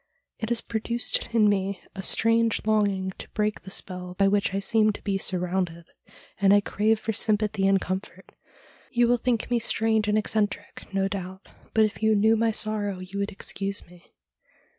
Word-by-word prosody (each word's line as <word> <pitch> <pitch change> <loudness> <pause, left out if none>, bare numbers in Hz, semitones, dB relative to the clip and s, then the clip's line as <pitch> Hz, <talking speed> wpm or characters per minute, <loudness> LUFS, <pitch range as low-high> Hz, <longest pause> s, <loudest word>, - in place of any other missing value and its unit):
It 220 - -3
has 235 -1 +2
produced 235 +1 -1
in 225 -2 +4
me 200 -1 0
a 190 - -6
strange 230 +3 +2
longing 200 -3 +1
to - - -6
break 210 -1 -1
the 190 - -11
spell 180 -1 -2
by 195 - +4
which 200 0 +1
I 195 - -2
seem 215 +2 +3
to - - -10
be 195 -2 -1
surrounded, 180 -2 -2 0.5
and 200 0 +5
I - - +6
crave 215 +2 +1
for 225 - -3
sympathy 210 -2 +1
and 195 0 +4
comfort. 185 +2 -6 0.6
You 240 -2 +2
will 245 +1 +3
think 240 -1 -1
me 240 - +3
strange 220 -1 +1
and 210 0 +2
eccentric, 210 -2 -2
no 195 0 +1
doubt, 190 -1 -6 0.3
but 220 -1 +5
if 215 - -5
you 220 0 +3
knew 220 +2 +4
my 225 +1 +2
sorrow 210 -2 -1
you 185 +2 -7
would 200 +2 -2
excuse 195 0 -3
me.' 175 0 -20
205 Hz, 185 wpm, -26 LUFS, 195-220 Hz, 0.6 s, I